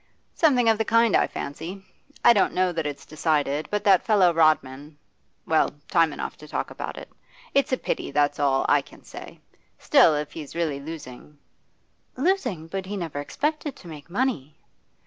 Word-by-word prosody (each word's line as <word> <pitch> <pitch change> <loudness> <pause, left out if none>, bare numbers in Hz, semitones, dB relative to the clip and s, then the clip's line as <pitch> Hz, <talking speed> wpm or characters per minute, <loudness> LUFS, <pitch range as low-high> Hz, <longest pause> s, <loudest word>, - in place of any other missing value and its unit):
'Something 260 -8 +3
of 225 -1 +3
the - - +2
kind, 230 0 +3
I - - +3
fancy. 170 +7 -7 0.4
I 240 - +9
don't 205 - +1
know 185 0 +2
that 165 -3 -2
it's 145 -1 -7
decided, 150 -1 -1
but 210 0 -2
that 195 -3 +5
fellow 195 -6 +4
Rodman 150 -2 +1 0.5
well, 160 -1 +2 0.2
time 165 -2 +4
enough - - -5
to 150 - -13
talk - - -4
about - - -6
it. - - -9 0.5
It's 275 -1 +2
a 260 - +2
pity, - - -3
that's 145 0 +1
all 135 -2 +2
I - - +4
can - - -18
say. - - -11 0.4
Still, 155 - +5
if 150 0 -3
he's 150 -1 -9
really 160 -5 -1
losing 150 -2 -10 0.4
' - - -40
'Losing? 275 - 0
But 190 +3 -5
he 205 +1 -4
never 165 -6 -4
expected 295 - -3
to 180 - -14
make 155 -1 -11
money. 185 - -2
165 Hz, 180 wpm, -25 LUFS, 150-210 Hz, 0.5 s, I